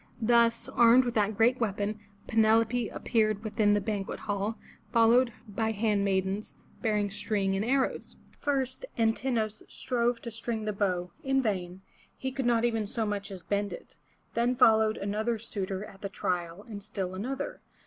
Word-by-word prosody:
Thus, 230 0 +3
armed 240 +2 +5
with 240 - -1
that 210 -2 +1
great 240 +3 +4
weapon, 210 -1 -1 0.3
Penelope 225 +1 +3
appeared 215 -2 0
within 215 -1 +2
the - - +3
banquet 200 -1 -3
hall, 205 +1 -2 0.3
followed 235 +1 +5 0.2
by 220 +2 -1
hand 210 -1 +1
maidens, 195 +1 -1 0.3
bearing 210 -3 +1
string 200 -2 -1
and 195 - 0
arrows. 265 +3 0 0.2
First 270 - -1
An 225 -1 +3
tin'o 240 -3 0
us 215 0 -9
strove 240 -1 0
to 235 - -5
string 225 0 -3
the 210 - -1
bow 180 -3 -1
— - - -30
in 270 0 +2
vain, 190 -6 -2 0.4
he 265 - -3
could 265 -2 -2
not 235 -1 +3
even 225 -3 0
so 225 +2 -1
much 205 -1 -3
as 190 -3 -8
bend 205 0 -1
it. - - -11 0.4
Then 240 +2 +1
followed 220 -3 +5
another 215 +4 -1
suitor 200 -2 -4
at 195 - -14
the 200 - -4
trial 175 -1 -3
and 210 -3 -7
still 195 -3 -4
another. 240 +9 -4
220 Hz, 170 wpm, -29 LUFS, 200-235 Hz, 0.4 s, armed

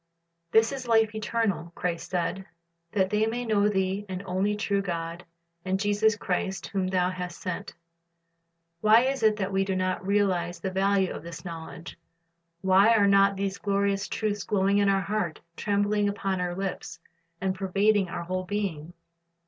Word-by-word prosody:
"^ - - -47
"This 225 +4 +4
is 265 -3 -5
life 225 -2 +3
eternal," 215 -5 -1
Christ 170 -2 -3
said, 190 +1 -2 0.5
"that 190 -2 +1
they 210 +1 +2
might 240 +2 -3
know 210 -1 +3
Thee 190 0 0
the 185 0 -4
only 195 +2 0
true 200 -1 0
God, 170 -2 -4 0.4
and 190 0 -1
Jesus 205 +1 +2
Christ, 190 -1 -2
whom 190 -2 -2
Thou 185 -1 +1
hast 180 -1 -6
sent."' 180 -2 -5 1.0
Why 215 +4 +6
is 265 +1 0
it 215 -1 +4
that 200 -2 -2
we 195 0 +2
do 195 -1 -2
not 185 0 -1
realize 185 -3 +1
the 190 +2 -3
value 195 0 +2
of - - -7
this 170 +3 -9
knowledge? 165 0 -8 0.6
Why 195 +4 +5
are 205 -2 +4
not 200 0 +5
these 195 0 -2
glorious 200 -1 0
truths 205 -3 -2
glowing 200 +1 +2
in 200 -1 +3
our 195 0 +3
hearts, 195 -5 -2
trembling 205 +1 +1
upon 195 -2 -2
our 175 -1 -2
lips, 195 0 -5 0.4
and 190 0 0
pervading 195 +1 +2
our 170 - -4
whole 185 +2 -3
being? 180 -5 -3
195 Hz, 170 wpm, -27 LUFS, 185-205 Hz, 1.0 s, Why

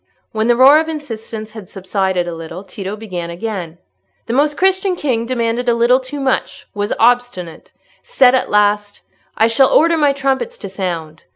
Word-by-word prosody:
When 220 0 -1
the 240 - +4
roar 270 +5 +7
of 320 0 -2
insistence 225 -7 -7
had 215 -4 -11
subsided 190 -2 -2
a 175 - -4
little, 165 +3 -8
Tito 195 +1 -6
began 185 -6 -6
again— 175 -2 -5 0.5
"The 230 - -4
Most 290 +3 +1
Christian 380 0 +2
King 245 -8 -2
demanded 235 0 -1
a 235 - +3
little 240 +2 +3
too 265 +2 -7
much—was 210 -6 -3
obstinate—said 245 - 0
at 260 - +1
last, 205 0 +1 0.4
'I 220 - +4
shall 230 +4 +3
order 330 +1 +4
my 295 -2 +3
trumpets 275 - -2
to - - -8
sound. 170 -5 -5
230 Hz, 165 wpm, -17 LUFS, 195-270 Hz, 0.5 s, roar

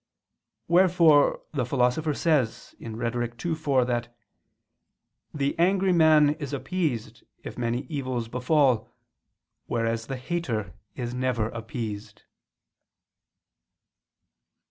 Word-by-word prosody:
Wherefore 170 -4 +4
the 140 -4 0
Philosopher 125 +5 +1
says 145 -9 0
(Rhet. 120 +2 -4
ii, 170 - +1
4) 140 -5 +1
that 120 -1 -3 1.1
"the 140 +1 -2
angry 190 +1 +3
man 155 -3 +5
is 145 -2 -5
appeased 145 -5 -3 0.2
if - - -7
many 120 +2 -2
evils 130 -4 -3
befall, 125 -1 +2 0.8
whereas 115 -1 -1
the 135 - -4
hater 125 - -3 0.2
is 120 -1 -4
never 125 -3 -1
appeased." 110 -2 -6
125 Hz, 95 wpm, -26 LUFS, 115-155 Hz, 1.1 s, man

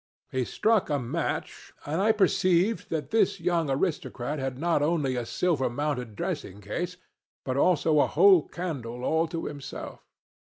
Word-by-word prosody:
He 130 -1 0
struck 220 - +1
a 145 - +1
match, 140 +6 -4
and 155 +5 -1
I 215 +2 +5
perceived 190 0 +2
that 150 -3 -3
this 200 -3 +2
young 165 -3 0
aristocrat 145 -2 -2
had 135 -1 -3
not 165 0 +1
only 145 -4 +1
a 120 -2 -3
silver 160 -9 +1
mounted 125 -4 -3
dressing 100 0 -4
case 175 - -4 0.5
but 130 - -1
also 155 0 +3
a - - +4
whole 185 -1 +5
candle 125 -9 -5
all 160 +4 +2
to 165 +1 -4
himself. 140 -2 -7
155 Hz, 155 wpm, -27 LUFS, 135-180 Hz, 0.5 s, I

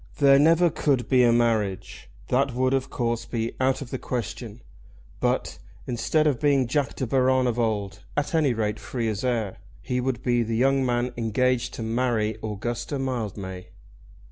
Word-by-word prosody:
There 140 -1 +6
never 165 +3 +5
could 135 -5 0
be 130 -2 +4
a 120 - +5
marriage. 110 - 0 0.2
That 135 0 +1
would, 130 +1 +1
of 135 0 0
course, 115 -1 -2
be 115 -1 -3
out 130 +1 +1
of 120 - -13
the 130 - -3
question. 115 -1 -5 0.6
But, - - -1 0.3
instead 130 +6 +1
of 140 -6 +2
being 145 -2 +3
the 125 - -1
Jack 140 -2 0
De 130 - -2
Baron 130 +1 +2
of 120 -1 0
old, 100 -5 -1 0.2
at 145 +2 -1
any 150 -7 +2
rate 105 -1 -1
free 115 +2 -3
as 105 +1 -3
air, 115 -6 -1 0.2
he 125 - -2
would 125 -2 -2
be 120 -1 +2
the 115 0 -1
young 135 +2 +3
man 120 0 0
engaged 120 +2 0
to 115 - -5
marry 115 -2 0
Augusta 120 +6 -3
Mildmay. 105 -8 -4
120 Hz, 175 wpm, -25 LUFS, 115-130 Hz, 0.6 s, There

